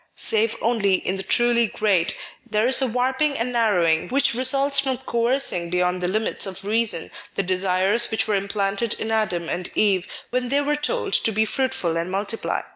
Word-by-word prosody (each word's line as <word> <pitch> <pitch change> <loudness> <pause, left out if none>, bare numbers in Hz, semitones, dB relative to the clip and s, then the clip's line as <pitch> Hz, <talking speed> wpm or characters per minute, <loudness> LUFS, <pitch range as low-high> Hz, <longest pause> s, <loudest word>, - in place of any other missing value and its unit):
Save 225 0 +1
only 215 -5 +2
in 185 +1 -2
the - - 0
truly 235 +2 +2
great, 195 -6 0 0.3
there 215 0 +1
is 260 +2 +3
a 265 - +2
warping 260 +5 0
and 235 +2 -2
narrowing 180 -9 +2
which 275 0 +2
results 275 +3 +2
from 265 -2 0
coercing 235 -8 0
beyond 180 +1 0
the 180 - 0
limits 215 +2 0
of 190 +1 -7
reason 220 -5 -1 0.2
the 195 - 0
desires 190 +5 +1
which 220 - -1
were 215 - 0
implanted 200 +2 -1
in 220 - -4
Adam 190 -7 -1
and 180 +2 -4
Eve 195 -3 +2 0.3
whtn 250 -1 -1
they 280 +2 +2
were 295 +1 0
told 480 +12 -2
to 225 - +2
be 220 +1 +1
fruitful 260 -9 -1
and 170 +2 -2
multiply. 200 +4 -2
220 Hz, 185 wpm, -23 LUFS, 190-250 Hz, 0.3 s, is